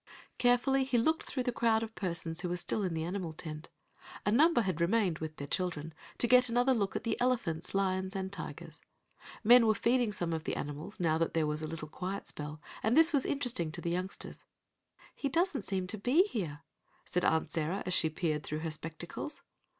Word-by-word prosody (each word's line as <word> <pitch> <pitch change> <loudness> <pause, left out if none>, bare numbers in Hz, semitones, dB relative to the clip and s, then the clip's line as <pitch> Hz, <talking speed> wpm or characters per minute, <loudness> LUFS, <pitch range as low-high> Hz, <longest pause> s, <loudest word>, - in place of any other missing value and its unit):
Carefully 255 +2 +3
he 260 -2 +1
looked 315 +8 +2
through 255 - -2
the 245 - 0
crowd 225 -2 +2
of 225 0 -6
persons 170 -4 -2
who 180 - -2
were 175 - -1
still 210 - 0
in 180 -4 -1
the 160 - -1
animal 175 -1 -3
tent. 155 -1 -7 0.6
A 205 - +2
number 305 +3 +5
had 185 -6 -2
remained, 185 -2 +2
with 155 -1 -5
their 140 - -5
children, 160 -1 -3 0.2
to - - +2
get 250 +1 +6
another 245 +3 +3
look 200 -5 -1
at - - -2
the 230 0 -2
elephants, 200 -11 0
lions 190 0 0
and 190 0 -3
tigers. - - -7 0.6
Men 235 +1 +7
were 215 - +4
feeding 240 0 +2
some 175 -4 -2
of 160 -1 -3
the - - -1
animals, 150 +9 -6
now 160 -2 +2
that 165 - 0
there 160 -1 +3
was 150 +1 -2
a 155 - -3
little 155 -1 -5
quiet 190 +5 -5
spell, 150 +1 -6 0.2
and 225 +6 +2
this 325 +1 +6
was 275 -3 +3
interesting 245 - -1
to 175 - -5
the 170 - -2
youngsters. 185 +2 -5 0.7
"He 280 - -2
doesn't 335 0 +1
seem 190 -2 -1
to 205 +3 -4
be 260 - +4
here," 175 - -4 0.4
said 180 - -1
Aunt 160 0 +2
Sarah, 165 +4 -1
as 185 - 0
she 160 - +4
peered 155 -1 -1
through 150 +2 -4
her 160 -1 -2
spectacles. 165 - -6
190 Hz, 210 wpm, -32 LUFS, 160-240 Hz, 0.7 s, Men